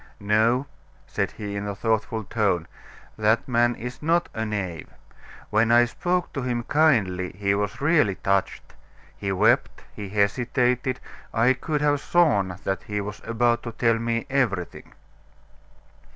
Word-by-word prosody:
"No," 110 +6 +2 0.4
said - - -2
he 100 -1 -6
in 100 0 -3
a 100 - -3
thoughtful 110 +1 -1
tone, 100 -6 0 0.5
"that 110 +7 +2
man 120 -1 +2
is 125 +2 -7
not 170 +3 +1
a 110 - -2
knave. 95 -6 -4 0.6
When 110 +2 +3
I 120 +1 +6
spoke 175 +8 -2
to 135 - -3
him 120 -2 -2
kindly 110 - +2
he 100 +1 0
was 100 +3 -2
really 150 - +3
touched; 100 +1 -1 0.4
he 100 - -3
wept, 95 - +2
he 100 -2 -6
hesitated. 125 +5 +1 0.4
I 120 +3 +4
could 150 +3 -3
have 145 -1 +2
sworn 105 - +2
that 95 -1 -2
he 105 0 -4
was 105 0 -6
about 120 +1 +2
to 115 - -7
tell 115 -1 +2
me 115 0 -1
everything." 115 -10 -2
115 Hz, 145 wpm, -24 LUFS, 100-125 Hz, 0.6 s, I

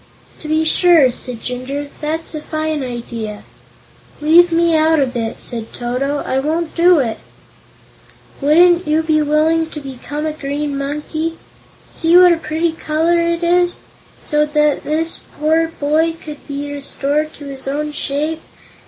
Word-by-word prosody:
"To 310 - -9
be 315 +1 +1
sure!" 320 -5 +5
cried 245 -1 -7
Jinjur. 265 +3 -4
"That's 320 +2 -3
a 305 - -5
fine 310 -2 -2
idea." 230 -4 -6 0.8
"Leave 335 +4 +5
me 335 0 +3
out 315 0 +3
of 265 -2 0
it," 225 -1 -3
said 230 -2 -4
Toto. 260 +4 -2
"I 260 - 0
won't 315 +4 -2
do 350 +1 +5
it." 230 -6 -1 1.2
"Wouldn't 345 +4 +4
you 310 +1 +2
be 310 -1 +2
willing 310 +2 +2
to 305 - -7
become 285 +2 -6
a 310 - -1
green 290 -1 -3
monkey 300 +4 -3 0.6
see 330 +2 +4
what 360 -1 +8
a - - -1
pretty 320 +1 -1
color 325 +2 0
it 335 0 -1
is 350 +1 +2 0.4
so 300 -1 +1
that 300 -1 +1
this 320 +2 -1 0.2
poor 320 +2 +2
boy 310 +3 +2
could 300 -3 -10
be 285 0 -5
restored 285 +2 -2
to 290 - -11
his 270 -1 -8
own 300 +2 -2
shape?" 300 +2 -2
300 Hz, 155 wpm, -17 LUFS, 280-325 Hz, 1.2 s, what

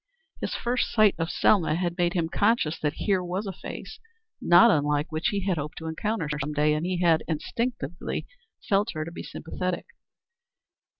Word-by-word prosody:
His - - -3
first 245 +1 -1
sight 215 -3 +5
of 165 0 -1
Selma 170 -7 +3
had 175 0 -1
made 175 0 +2
him 170 -3 0
conscious 200 -3 +1
that 150 -1 0
here 195 -3 +2
was 185 +4 -3
a 195 - -4
face - - -8 0.4
not 175 +7 +7
unlike 150 -2 +1
what 155 +1 -3
he 205 -4 0
had 185 -4 0
hoped 150 +2 -5
to 160 - -7
encounter 165 +3 -2
some 150 +2 -3
day, 150 +1 +3
and 155 +3 -1
he 180 -1 -1
had 165 -3 +4
instinctively 180 +4 -3 0.4
felt 200 +2 +2
her 155 -1 -3
to 165 - -7
be - - -7
sympathetic. 180 +2 -4
175 Hz, 180 wpm, -26 LUFS, 155-200 Hz, 0.4 s, not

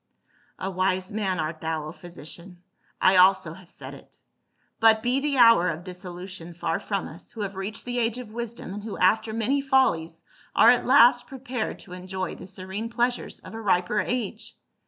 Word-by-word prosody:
"A 190 - -4
wise 185 0 0
man, 195 -4 -1
art 155 0 -3
thou, 160 -1 -2
O 155 - -6
physician, 175 +1 -10 0.4
I 185 0 +5
also 185 -3 +5
have 180 0 -15
said - - -10
it. - - -15 0.6
But 220 -1 +5
be 250 +2 +2
the 280 -1 -1
hour 230 -7 +6
of 165 +1 -4
dissolution 180 -1 -8
far 165 -1 -1
from 200 -3 -3
us, 165 - -11
who 225 - -7
have 200 -1 -4
reached 195 +3 -4
the 245 0 -2
age 230 0 0
of 245 -4 -8
wisdom, 235 -4 -6
and 205 - -6
who 215 -2 -6
after 220 +4 +3
many 230 +6 0
follies 260 - +1 0.3
are 235 - +8
at 245 - +1
last 245 -2 +6
prepared 260 -3 -4
to 180 - -12
enjoy 185 +1 -5
the - - -10
serene 190 +4 -5
pleasures 240 +1 -1
of - - -11
a 225 - -6
riper 190 0 +1
age. 230 -2 -3
195 Hz, 185 wpm, -25 LUFS, 180-235 Hz, 0.6 s, are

